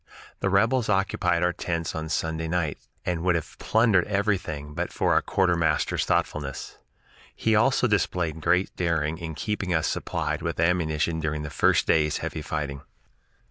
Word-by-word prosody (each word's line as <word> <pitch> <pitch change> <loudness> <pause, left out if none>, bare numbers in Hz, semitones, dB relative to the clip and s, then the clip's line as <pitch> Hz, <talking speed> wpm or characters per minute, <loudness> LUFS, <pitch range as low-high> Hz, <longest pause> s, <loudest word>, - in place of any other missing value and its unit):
The 95 - 0
rebels 110 +5 +2
occupied 90 -3 +1
our 90 0 +2
tents 85 -2 -3
on 80 0 -4
Sunday 80 0 -1
night, 80 -3 -1 0.3
and 85 -2 -1
would 90 0 +2
have 80 - -4
plundered 110 -5 +3
everything 95 -8 -1
but 85 +3 -3
for - - +1
our - - +4
quartermaster's 85 -5 +1
thoughtfulness. 70 -3 -2 0.6
He 110 -1 +1
also 125 +4 +3
displayed 90 -7 0
great 90 +4 +1
daring 80 -2 0
in 80 -2 -5
keeping 100 0 -2
us 80 - +1
supplied - - -2
with - - -3
ammunition 85 -1 +1
during 75 -1 -2
the 75 - -6
first - - +3
day's 75 -2 +2
heavy 80 - -4
fighting. 75 -3 -4
85 Hz, 155 wpm, -26 LUFS, 80-95 Hz, 0.6 s, our